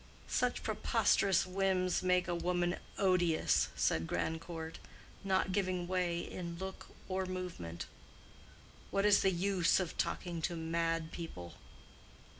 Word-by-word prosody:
"Such -, -, 0 dB
preposterous 195 Hz, -3 st, +2 dB
whims 185 Hz, -1 st, +1 dB
make 180 Hz, 0 st, +2 dB
a 175 Hz, -, 0 dB
woman 175 Hz, 0 st, 0 dB, 0.2 s
odious," 180 Hz, -4 st, +3 dB
said 80 Hz, 0 st, +1 dB
Grandcourt, 160 Hz, -, -3 dB, 0.4 s
not 190 Hz, -1 st, +1 dB
giving 185 Hz, -2 st, 0 dB
way 180 Hz, -2 st, 0 dB
in 170 Hz, -2 st, -6 dB
look 190 Hz, +1 st, -6 dB, 0.2 s
or 185 Hz, 0 st, -1 dB
movement. 170 Hz, -, -5 dB, 1.0 s
"What 195 Hz, +1 st, +1 dB
is 205 Hz, -1 st, +6 dB
the 195 Hz, -, +4 dB
use 185 Hz, -1 st, +2 dB
of 180 Hz, -3 st, -4 dB
talking 170 Hz, -2 st, -1 dB
to 170 Hz, -, -1 dB
mad 165 Hz, 0 st, -1 dB
people?" 90 Hz, -, -7 dB
180 Hz, 120 wpm, -34 LUFS, 165-185 Hz, 1.0 s, is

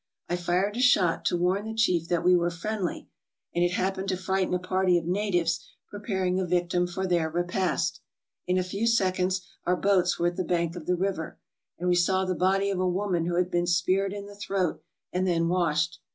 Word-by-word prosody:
I 175 Hz, -, -1 dB
fired 180 Hz, +5 st, 0 dB
a -, -, 0 dB
shot 185 Hz, -9 st, +3 dB
to 175 Hz, -, +2 dB
warn 185 Hz, +4 st, +1 dB
the 220 Hz, 0 st, -5 dB
chief 180 Hz, -7 st, +2 dB
that 175 Hz, -1 st, 0 dB
we 180 Hz, 0 st, +5 dB
were 175 Hz, 0 st, +2 dB
friendly, 185 Hz, +2 st, -4 dB, 0.5 s
and 175 Hz, -, +1 dB
it 175 Hz, 0 st, +1 dB
happened 190 Hz, +1 st, -1 dB
to 185 Hz, -, 0 dB
frighten 190 Hz, 0 st, -1 dB
a -, -, +2 dB
party 185 Hz, 0 st, +1 dB
of 170 Hz, -, -3 dB
natives 175 Hz, -3 st, 0 dB, 0.3 s
preparing 190 Hz, -3 st, -1 dB
a 190 Hz, -, 0 dB
victim 175 Hz, 0 st, +1 dB
for 190 Hz, +2 st, -3 dB
their 170 Hz, -3 st, +1 dB
repast. 175 Hz, +3 st, -1 dB, 0.5 s
In 180 Hz, +1 st, +2 dB
a 185 Hz, -, +2 dB
few 200 Hz, +5 st, -2 dB
seconds 185 Hz, -4 st, +1 dB, 0.2 s
our 180 Hz, -, +2 dB
boats 185 Hz, -2 st, +2 dB
were 170 Hz, -, 0 dB
at 175 Hz, -, -10 dB
the 185 Hz, -, 0 dB
bank 170 Hz, -1 st, -1 dB
of 170 Hz, -3 st, -8 dB
the 180 Hz, -, +2 dB
river, 185 Hz, -3 st, -3 dB, 0.4 s
and 180 Hz, -, -3 dB
we 180 Hz, -, +4 dB
saw 185 Hz, +2 st, +2 dB
the 185 Hz, -, 0 dB
body 195 Hz, +3 st, +1 dB
of 190 Hz, -, -2 dB
a 185 Hz, 0 st, +1 dB
woman 180 Hz, -2 st, -1 dB
who 175 Hz, -, -1 dB
had 180 Hz, +1 st, +1 dB
been 175 Hz, 0 st, +1 dB
speared 185 Hz, +3 st, +1 dB
in 200 Hz, 0 st, -6 dB
the 205 Hz, -, -11 dB
throat 195 Hz, -3 st, -2 dB, 0.3 s
and 185 Hz, +1 st, 0 dB
then 165 Hz, -2 st, +1 dB
washed. 170 Hz, -1 st, 0 dB
180 Hz, 215 wpm, -27 LUFS, 175-190 Hz, 0.5 s, we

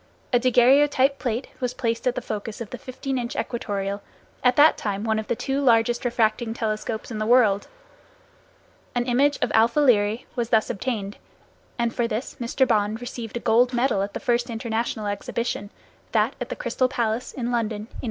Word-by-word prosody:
A 245 Hz, -, +5 dB
daguerreotype 265 Hz, +3 st, +4 dB
plate 245 Hz, -1 st, -2 dB
was 250 Hz, -1 st, -2 dB
placed 230 Hz, 0 st, -1 dB
at 250 Hz, -, +1 dB
the 250 Hz, -, -3 dB
focus 215 Hz, 0 st, -5 dB
of 230 Hz, -3 st, -7 dB
the 250 Hz, -, -6 dB
15 260 Hz, +2 st, -4 dB
inch 235 Hz, -1 st, -4 dB
equatorial, 200 Hz, -4 st, -3 dB, 0.4 s
at 250 Hz, -1 st, +4 dB
that 300 Hz, +2 st, +6 dB
time 205 Hz, -1 st, -3 dB
one 220 Hz, -1 st, +1 dB
of 220 Hz, -, -5 dB
the -, -, 0 dB
two 270 Hz, +4 st, -2 dB
largest 240 Hz, -1 st, +3 dB
refracting 230 Hz, -1 st, 0 dB
telescopes 220 Hz, 0 st, -3 dB
in 215 Hz, -, -4 dB
the 215 Hz, -, -1 dB
world. 225 Hz, -5 st, +4 dB, 1.3 s
An 240 Hz, 0 st, +1 dB
image 275 Hz, +4 st, +3 dB
of -, -, +1 dB
[Greek: -, -, +3 dB
alpha] 230 Hz, +6 st, +4 dB
Lyræ 225 Hz, -5 st, +3 dB
was 235 Hz, -2 st, -1 dB
thus 220 Hz, -1 st, +2 dB
obtained, 205 Hz, -3 st, -3 dB, 0.6 s
and 235 Hz, -1 st, 0 dB
for 240 Hz, -2 st, 0 dB
this 225 Hz, +3 st, -4 dB
Mr. 250 Hz, +3 st, +1 dB
Bond 215 Hz, -1 st, +1 dB
received 240 Hz, -2 st, -6 dB
a -, -, -6 dB
gold 245 Hz, +3 st, +3 dB
medal 240 Hz, -4 st, +2 dB
at 200 Hz, +1 st, -4 dB
the -, -, -2 dB
first 240 Hz, 0 st, 0 dB
international 225 Hz, -1 st, -2 dB
exhibition, 205 Hz, +1 st, -3 dB, 0.4 s
that -, -, +2 dB
at -, -, -4 dB
the -, -, -3 dB
Crystal 255 Hz, -, 0 dB
Palace, 235 Hz, -2 st, -2 dB
in 245 Hz, -2 st, -3 dB
London, 230 Hz, -2 st, 0 dB
in 205 Hz, -, -6 dB
1851. 220 Hz, -, -12 dB
235 Hz, 190 wpm, -24 LUFS, 220-250 Hz, 1.3 s, that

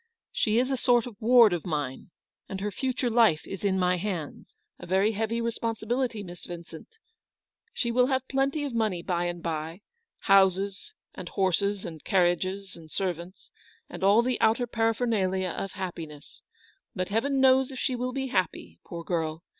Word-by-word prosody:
She 215 Hz, +1 st, +1 dB
is 255 Hz, +2 st, +2 dB
a 265 Hz, -, +1 dB
sort 240 Hz, -1 st, +3 dB
of 245 Hz, -4 st, -8 dB
ward 230 Hz, -3 st, +6 dB
of 175 Hz, -, -2 dB
mine, 145 Hz, -3 st, -4 dB, 0.4 s
and 195 Hz, -, -4 dB
her 205 Hz, +1 st, -2 dB
future 255 Hz, +2 st, -1 dB
life 220 Hz, -10 st, +4 dB
is 195 Hz, -, -7 dB
in 195 Hz, -2 st, +2 dB
my 180 Hz, -1 st, +2 dB
hands; 180 Hz, -, -5 dB, 0.2 s
a -, -, -9 dB
very 190 Hz, +4 st, +3 dB
heavy 225 Hz, +2 st, -1 dB
responsibility, 230 Hz, 0 st, -2 dB
Miss 175 Hz, -1 st, -10 dB
Vincent; 170 Hz, -, -10 dB, 0.7 s
she 235 Hz, -, -1 dB
will 250 Hz, +1 st, +4 dB
have 260 Hz, -1 st, 0 dB
plenty 275 Hz, +2 st, 0 dB
of 280 Hz, -4 st, -3 dB
money 215 Hz, -7 st, 0 dB
by 175 Hz, -2 st, -1 dB
and 175 Hz, -1 st, -4 dB
by 165 Hz, +2 st, -4 dB, 0.2 s
— 460 Hz, -, -54 dB
houses, 195 Hz, -, +3 dB, 0.2 s
and -, -, -7 dB
horses, 195 Hz, +1 st, 0 dB
and 160 Hz, -3 st, -8 dB
carriages, 185 Hz, +1 st, 0 dB
and 160 Hz, -2 st, -13 dB
servants, 180 Hz, +1 st, -4 dB, 0.4 s
and -, -, -7 dB
all 205 Hz, +4 st, +5 dB
the 255 Hz, 0 st, -1 dB
outer 230 Hz, +3 st, +3 dB
paraphernalia 225 Hz, -5 st, 0 dB
of 195 Hz, +3 st, -5 dB
happiness: 165 Hz, -6 st, -7 dB, 0.5 s
but 185 Hz, -1 st, -2 dB
Heaven 270 Hz, +6 st, +1 dB
knows 265 Hz, 0 st, +5 dB
if 265 Hz, -, -8 dB
she 255 Hz, -, -1 dB
will 250 Hz, +1 st, -2 dB
be 265 Hz, 0 st, -3 dB
happy, 155 Hz, -, -2 dB
poor 170 Hz, -1 st, -7 dB
girl. 165 Hz, -1 st, -2 dB
200 Hz, 170 wpm, -27 LUFS, 175-240 Hz, 0.7 s, ward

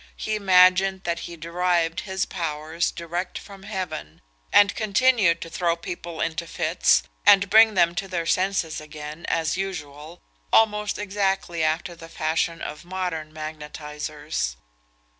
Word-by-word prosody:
He 215 Hz, -, -3 dB
imagined 190 Hz, -1 st, +4 dB
that 170 Hz, -1 st, -2 dB
he 170 Hz, -, -9 dB
derived 170 Hz, 0 st, 0 dB
his 190 Hz, -1 st, -2 dB
powers 160 Hz, -1 st, -2 dB
direct 175 Hz, +2 st, -4 dB
from 200 Hz, -2 st, -11 dB
heaven, 185 Hz, -, -6 dB, 0.3 s
and 205 Hz, -1 st, +6 dB
continued 215 Hz, -5 st, +3 dB
to 165 Hz, -, -6 dB
throw 170 Hz, -2 st, +1 dB
people 170 Hz, -1 st, -6 dB
into 165 Hz, +1 st, -2 dB
fits, -, -, +2 dB, 0.2 s
and 200 Hz, 0 st, +6 dB
bring 220 Hz, 0 st, +7 dB
them 170 Hz, -2 st, +4 dB
to 195 Hz, +2 st, -3 dB
their 175 Hz, -3 st, -2 dB
senses 185 Hz, -3 st, 0 dB
again, 150 Hz, +1 st, -8 dB
as 160 Hz, 0 st, 0 dB
usual, 160 Hz, -4 st, -6 dB, 0.3 s
almost 210 Hz, -1 st, +3 dB
exactly 195 Hz, -4 st, -1 dB
after 160 Hz, +3 st, -1 dB
the 165 Hz, 0 st, -12 dB
fashion 165 Hz, +1 st, -1 dB
of 150 Hz, -, -6 dB
modern 175 Hz, -4 st, -4 dB
magnetisers. 150 Hz, -, -5 dB
170 Hz, 135 wpm, -24 LUFS, 155-190 Hz, 0.3 s, bring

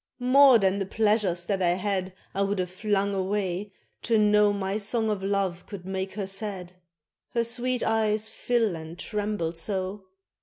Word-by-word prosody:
More 260 Hz, +1 st, +6 dB
than 195 Hz, -1 st, +1 dB
the 195 Hz, -, -2 dB
pleasures 205 Hz, -5 st, +1 dB
that 195 Hz, 0 st, -1 dB
I 175 Hz, -1 st, +3 dB
had 190 Hz, -1 st, -2 dB, 0.2 s
I 195 Hz, -, -1 dB
would 200 Hz, +1 st, 0 dB
have 180 Hz, -1 st, -2 dB
flung 200 Hz, 0 st, 0 dB
away 195 Hz, 0 st, -2 dB, 0.3 s
to 230 Hz, -1 st, +2 dB
know 210 Hz, -1 st, +4 dB
My 200 Hz, 0 st, -2 dB
song 220 Hz, +1 st, 0 dB
of 205 Hz, -2 st, -2 dB
love 195 Hz, -3 st, -1 dB
could 190 Hz, -4 st, -8 dB
make 190 Hz, 0 st, -3 dB
her 200 Hz, 0 st, -3 dB
sad, 195 Hz, -2 st, -4 dB, 0.6 s
Her 235 Hz, -, +3 dB
sweet 245 Hz, +1 st, -1 dB
eyes 220 Hz, -1 st, +1 dB
fill 225 Hz, -3 st, 0 dB
and 160 Hz, +1 st, -8 dB
tremble 205 Hz, -5 st, -2 dB
so. 190 Hz, +3 st, -3 dB
200 Hz, 165 wpm, -26 LUFS, 190-215 Hz, 0.6 s, More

